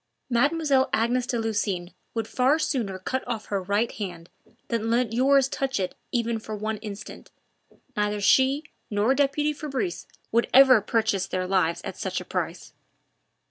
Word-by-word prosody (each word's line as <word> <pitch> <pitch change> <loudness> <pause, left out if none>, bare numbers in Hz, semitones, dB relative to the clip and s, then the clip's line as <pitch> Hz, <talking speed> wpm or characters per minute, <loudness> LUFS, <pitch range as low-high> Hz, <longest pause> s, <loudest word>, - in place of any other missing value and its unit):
Mademoiselle 280 +2 +2
Agnes 240 +2 +1
de 240 - -1
Lucines 205 -5 -2 0.2
would 225 -2 -2
far 260 +6 +2
sooner 235 -11 -1
cut 255 +8 -3
off 230 -3 -3
her 200 -2 -2
right 205 +5 0
hand 175 -5 -7 0.4
than 225 -1 -1
let 235 -1 +1
yours 270 +2 +4
touch 270 -3 -2
it 185 -1 -2 0.2
even 235 -2 0
for 215 0 -6
one 215 +1 -3
instant. 210 0 -9 0.7
Neither 210 -1 0
she 265 +7 +4 0.3
nor 210 +5 +2
deputy 290 +2 +1
Fabrice 245 - -4 0.2
would 235 +1 +2
ever 260 -4 +8
purchase 210 -3 0
their 185 0 -2
lives 180 -3 +1
at - - -6
such - - -2
a - - -9
price." - - -4
225 Hz, 155 wpm, -26 LUFS, 205-260 Hz, 0.7 s, ever